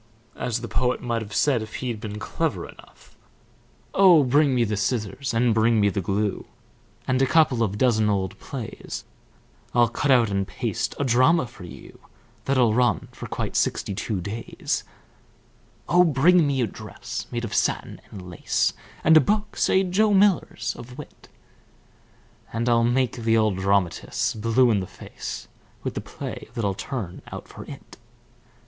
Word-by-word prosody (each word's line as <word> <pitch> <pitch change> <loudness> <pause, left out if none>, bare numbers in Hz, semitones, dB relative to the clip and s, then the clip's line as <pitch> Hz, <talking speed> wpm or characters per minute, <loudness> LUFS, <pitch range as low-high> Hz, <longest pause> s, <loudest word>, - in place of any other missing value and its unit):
As 120 -1 -2
the 120 - -5
poet 125 +4 0
might 115 -2 -2
have 105 -2 -8
said 135 -6 +2
if 110 0 -8
he'd 120 -4 -3
been 105 -2 -5
clever 110 - -2
enough: - - -17 0.8
Oh, 180 -6 +7
bring 140 +1 +3
me 120 - +3
the 105 -2 -1
scissors, 110 +4 -2
And 115 0 +2
bring 110 +1 +3
me 100 -1 +4
the 100 0 -2
glue, 100 +2 -1 0.6
And 130 +1 +2
a 135 - +4
couple 145 -6 +3
of 105 -3 0
dozen 110 -3 +3
old 100 0 -1
plays. 125 -6 -7 0.7
I'll 120 -1 +5
cut 135 +5 -2
out 120 -5 +5
and 100 -1 -1
paste - - -3
A - - +1
drama 130 +5 +4
for 115 -6 -12
you 85 - -12 0.5
That'll 125 -5 +3
run 125 +1 +1
for - - -8
quite - - -4
sixty - - 0
two 100 -1 -3
days. 105 +6 -3 1.0
Oh, 180 0 +5
bring 165 +2 +4
me 135 -2 0
a - - +3
dress 105 - -7
Made 120 -1 -3
of 115 - -6
satin - - -1
and 95 -3 -9
lace, 90 -2 0 0.3
And 160 - +6
a 155 - +9
book 210 +8 -1
say 190 - +3
Joe 200 +3 +2
Miller's 195 -1 +2
of 125 +2 -10
wit; 150 - -12 1.2
And 115 +2 -2
I'll 115 -1 +4
make 125 +1 +1
the 115 -1 +2
old 110 -4 +2
dramatists 95 -2 0
Blue 115 +3 +3
in 105 - +2
the 95 - -4
face - - -8 0.4
With - - -3
the - - -4
play - - -7
that 115 -4 -1
I'll 100 - +1
turn 95 -3 -5
out - - -7
for - - -10
it. - - -11
120 Hz, 170 wpm, -24 LUFS, 105-130 Hz, 1.2 s, a